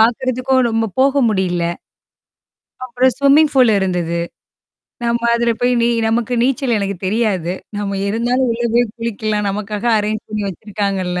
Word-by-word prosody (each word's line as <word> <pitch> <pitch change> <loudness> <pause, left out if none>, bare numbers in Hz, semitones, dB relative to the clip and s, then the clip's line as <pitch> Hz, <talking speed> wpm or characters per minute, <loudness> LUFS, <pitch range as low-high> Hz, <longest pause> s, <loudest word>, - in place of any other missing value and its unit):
பாக்குறதுக்கும் 255 +3 +2
ரொம்ப 225 0 0
போக 270 +1 +3
முடியல. 185 -4 0 1.2
அப்புறம் 255 +1 +2
ஸ்விம்மிங் 285 +2 +4
பூலு 250 -4 +5
இருந்தது. 175 -3 -1 0.9
நம்ம 235 0 0
அதுல 235 0 +1
போய் 245 0 +2
நீ - - +3 0.2
நமக்கு 230 +1 -1
நீச்சல் 260 -1 +1
எனக்குத் 200 -2 -4
தெரியாது. 190 -5 0 0.2
"நம்ம 200 -1 -3
இருந்தாலும் 240 +4 0
உள்ள 240 +1 -3
போய் 240 0 +4
குளிக்கலாம். 215 -2 -2
நமக்காக 210 +1 -4
அரேஞ் 215 +1 -2
பண்ணி 215 -1 -3
வச்சிருக்காங்கல்ல!" 195 -2 -3
225 Hz, 135 wpm, -17 LUFS, 200-245 Hz, 1.2 s, பூலு